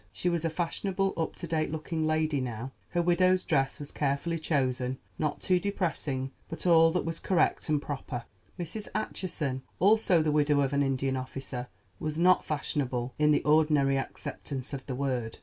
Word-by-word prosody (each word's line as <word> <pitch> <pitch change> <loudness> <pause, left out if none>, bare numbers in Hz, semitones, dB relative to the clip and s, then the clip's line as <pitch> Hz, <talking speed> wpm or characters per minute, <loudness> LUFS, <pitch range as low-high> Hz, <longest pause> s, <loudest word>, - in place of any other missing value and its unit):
She 140 - -1
was 170 -2 0
a 165 - +1
fashionable, 190 +4 -1
up 160 -1 -2
to - - -6
date 155 -1 0
looking 160 +1 -2
lady 155 -2 +1
now. 125 +1 -4 0.2
Her 175 - +1
widow's 185 +1 +3
dress 135 -3 +1
was 145 -1 -7
carefully 150 +4 -1
chosen—not 130 0 -1
too 185 -1 +3
depressing, 160 -9 -2 0.2
but 165 - -7
all 165 -2 +6
that 180 - 0
was 165 0 -3
correct 180 -3 +1
and 150 -1 +3
proper. 130 -4 -5 0.3
Mrs. 180 +5 -5
Acheson, 150 -10 -2 0.2
also 195 -4 +4
the 155 - +1
widow 145 -1 +3
of 135 0 0
an 140 - +3
Indian 135 -1 0
officer, 130 -1 -5 0.3
was 155 0 -3
not 180 +2 +5
fashionable 130 -4 -2
in 150 0 +4
the 150 - +3
ordinary 150 -2 +4
acceptance 135 0 -5
of 135 -1 -4
the 130 - -3
word. 125 -4 -2
150 Hz, 170 wpm, -29 LUFS, 135-170 Hz, 0.3 s, all